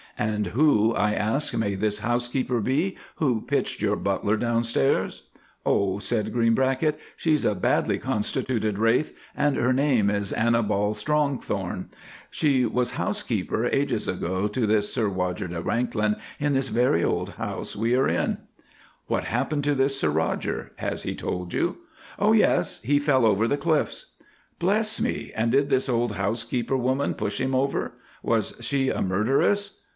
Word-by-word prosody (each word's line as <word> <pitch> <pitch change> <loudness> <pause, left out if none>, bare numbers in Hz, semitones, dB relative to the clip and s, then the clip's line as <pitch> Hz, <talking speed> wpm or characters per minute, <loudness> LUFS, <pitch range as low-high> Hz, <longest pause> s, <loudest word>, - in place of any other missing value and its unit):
"And 105 -1 -1
who," 115 - +3
I 105 -1 +1
asked, 110 +8 0
"may 100 -3 0
this 105 +2 0
housekeeper 120 +2 0
be 150 - 0 0.2
who 125 -8 +1
pitched - - -1
your - - +2
butler 105 - 0
down 115 +1 0
stairs?" 115 -13 0 0.4
"Oh," 100 -1 +2
said 110 0 -1
Greenbracket, 130 +6 +2 0.2
"she's 155 -3 +1
a 105 - +2
badly 90 - +1
constituted 110 -1 -1
wraith, 115 +7 +2 0.2
and 145 -1 +1
her 125 +2 +2
name 130 -6 +3
is 100 -1 -1
Annibal 110 -2 +1
Strongthorn. 145 +4 -1 0.4
She 135 -5 +2
was 125 +2 0
housekeeper - - -1
ages - - 0
ago 95 +3 -1
to 110 +2 -1
this 105 -1 +1
Sir 115 -4 +1
Roger 90 0 -2
de 85 -1 -4
Wanklyn 110 0 0 0.2
in 145 0 +1
this 135 -1 0
very 120 -8 +2
old - - -1
house - - -5
we 115 +4 +1
are 130 - +3
in." - - 0 0.7
"What - - 0
happened 140 +5 -1
to 145 -1 +2
this 135 0 +1
Sir 75 - +1
Roger? 75 - -1
Has - - -3
he - - -3
told 90 -1 -4
you?" 175 - 0 0.4
"Oh! 210 +2 +4
yes 220 - +2
he 145 +5 +3
fell 140 -4 +3
over 110 +1 +3
the 145 - +1
cliffs." 155 0 -1 0.5
"Bless 215 +4 +1
me, - - -2
and 115 +1 +1
did 140 +2 +3
this 135 0 +2
old 120 -3 0
housekeeper 115 +6 -1
woman 130 +3 0
push - - -3
him 130 0 0
over. 135 +2 0 0.3
Was - - 0
she 135 -2 0
a - - -1
murderess?" 135 - +1
120 Hz, 160 wpm, -25 LUFS, 105-135 Hz, 0.7 s, Oh